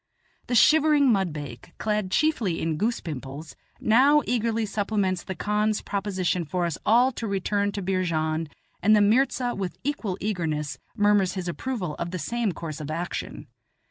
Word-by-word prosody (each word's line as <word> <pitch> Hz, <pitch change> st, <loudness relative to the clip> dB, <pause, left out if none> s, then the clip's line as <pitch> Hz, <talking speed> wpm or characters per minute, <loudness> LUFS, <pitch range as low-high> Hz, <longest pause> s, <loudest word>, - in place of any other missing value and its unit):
The 245 Hz, -, 0 dB
shivering 295 Hz, +1 st, +5 dB
mudbake, 155 Hz, -, -3 dB
clad 210 Hz, -3 st, -1 dB
chiefly 225 Hz, -, +1 dB
in 160 Hz, -1 st, -1 dB
goose 225 Hz, +6 st, 0 dB
pimples, 145 Hz, 0 st, -7 dB, 0.2 s
now 275 Hz, +7 st, +5 dB
eagerly 230 Hz, -2 st, 0 dB
supplements 200 Hz, -3 st, -1 dB
the 190 Hz, -, -5 dB
khan's 210 Hz, +3 st, 0 dB
proposition 190 Hz, -3 st, -1 dB
for 175 Hz, +3 st, -1 dB
us 170 Hz, -3 st, -2 dB
all 245 Hz, +4 st, +5 dB
to 230 Hz, -2 st, -5 dB
return 200 Hz, +1 st, 0 dB
to 200 Hz, -, -4 dB
Beerjand, 165 Hz, -4 st, -1 dB, 0.3 s
and 215 Hz, +1 st, +5 dB
the 210 Hz, -, +5 dB
mirza 245 Hz, +3 st, +2 dB
with 185 Hz, -4 st, -4 dB
equal 235 Hz, -9 st, -2 dB
eagerness 160 Hz, -8 st, -2 dB, 0.2 s
murmurs 205 Hz, -3 st, +3 dB
his 185 Hz, -2 st, -4 dB
approval 180 Hz, -, -3 dB
of 170 Hz, -, -2 dB
the 185 Hz, -, -4 dB
same 225 Hz, +6 st, -1 dB
course 160 Hz, -2 st, -6 dB
of 150 Hz, -, -6 dB
action. 170 Hz, +3 st, -4 dB
200 Hz, 155 wpm, -25 LUFS, 170-225 Hz, 0.3 s, shivering